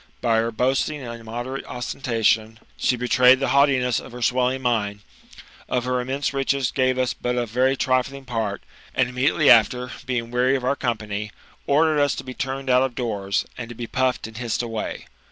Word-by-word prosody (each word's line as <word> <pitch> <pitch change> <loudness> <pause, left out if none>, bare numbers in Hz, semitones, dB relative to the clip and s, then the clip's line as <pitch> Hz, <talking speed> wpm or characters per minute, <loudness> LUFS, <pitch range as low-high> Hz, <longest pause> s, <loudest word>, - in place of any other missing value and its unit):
By 115 -2 +2
her 115 +1 +1
boasting 135 +5 0
and 115 -1 -7
immoderate 120 +4 -5
ostentation, 115 -3 0 0.2
she 125 - +1
betrayed 125 +1 +5
the 135 - 0
haughtiness 135 -4 +3
of - - -11
her 125 -1 -5
swelling 130 +2 +1
mind; 105 -4 0 0.7
of 125 -1 0
her 125 0 0
immense 135 +3 -2
riches 135 -1 0
gave 130 -1 +1
us 130 -1 +1
but 125 0 -2
a 120 -1 0
very 130 +4 +1
trifling 135 +1 0
part; 115 -5 -3 0.3
and 125 - +3
immediately 130 +4 +1
after, 125 +2 +4 0.2
being 120 -2 -2
weary 125 +2 +2
of 130 - -2
our 140 - +2
company, 110 -5 -3 0.4
ordered, 155 +1 +3
us 145 -1 +2
to - - -6
be 130 - -7
turned 135 +1 -4
out 125 0 +4
of 130 -2 -1
doors, 100 -5 -1
and 115 -1 -6
to 120 - -8
be 120 - -5
puffed 130 0 0
and 110 0 -9
hissed 120 0 -2
away. 115 -2 -4
125 Hz, 190 wpm, -23 LUFS, 115-130 Hz, 0.7 s, betrayed